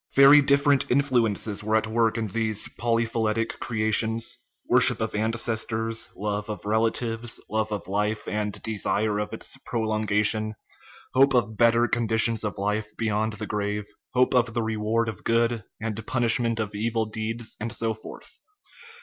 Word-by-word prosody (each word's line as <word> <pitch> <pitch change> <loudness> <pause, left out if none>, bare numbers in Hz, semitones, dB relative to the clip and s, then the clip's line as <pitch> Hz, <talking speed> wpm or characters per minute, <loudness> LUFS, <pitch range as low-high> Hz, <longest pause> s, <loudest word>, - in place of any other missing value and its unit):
Very 140 +2 +8
different 140 0 +3
influences 115 -6 +1
were 110 +1 +1
at 110 - +2
work 115 +1 +1
in 115 - -1
these 110 0 -2
polyphyletic 115 -1 -1
creations 110 0 0 0.3
worship - - +4
of 110 - -2
ances 110 +1 -2
tors, 115 0 -2
love 105 0 -3
of 105 - -6
relatives, 115 +1 0
love 110 0 -1
of 105 - -4
life 105 +2 -1
and 105 -1 -3
desire 105 -1 0
of 105 - -3
its - - -4
pro 115 - -2
longation, 110 0 +1 0.6
hope 135 +1 +4
of 115 -3 +1
better 115 +1 +4
conditions 115 -1 +2
of 105 - -3
life 105 +2 -1
beyond 110 -1 0
the 105 - -5
grave, 105 0 -2 0.3
hope 125 +1 +3
of 120 -2 +2
the 115 - 0
reward 110 +1 0
of 110 -5 -6
good 115 -1 +1 0.2
and 110 -1 -4
punishment 115 -2 +2
of 105 -1 -3
evil 110 +2 -1
deeds, 110 +1 -4
and 110 +1 -4
so 115 -1 -1
forth. 110 - -12
110 Hz, 155 wpm, -25 LUFS, 105-115 Hz, 0.6 s, Very